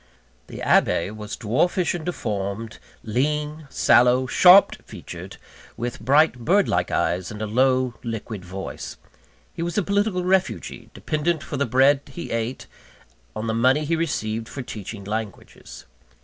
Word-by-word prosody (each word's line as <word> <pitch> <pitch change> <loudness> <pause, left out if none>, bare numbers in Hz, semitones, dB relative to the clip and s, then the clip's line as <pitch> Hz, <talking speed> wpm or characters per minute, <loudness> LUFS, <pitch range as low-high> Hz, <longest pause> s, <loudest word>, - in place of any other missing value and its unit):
The - - -8
Abbe 85 +4 +2
was 105 -1 -7
dwarfish 170 - +1
and 175 - -5
deformed, 110 - -4 0.2
lean, 150 +6 -2
sallow, 125 0 +4
sharp 180 +9 +6
featured, - - -10 0.4
with 120 +2 -4
bright 140 +2 +3
bird 190 - +2
like - - 0
eyes, 90 +2 -1
and 105 - -8
a 110 - -2
low, 130 +3 +2
liquid 110 -4 -6
voice. 95 +2 -7 0.6
He - - -6
was 175 +2 -3
a 205 - +2
political 200 -2 0
refugee, 180 - -1
dependent 155 +1 -1
for 145 - -5
the 140 0 0
bread 135 +4 +4
he 155 +5 -8
ate, 115 +2 -3 0.7
on 110 - -4
the 110 - -1
money 130 +6 +2
he 165 +3 +1
received 115 -9 -2
for 130 - -6
teaching 105 -2 -8
languages. 105 - -7
130 Hz, 145 wpm, -23 LUFS, 110-155 Hz, 0.7 s, sharp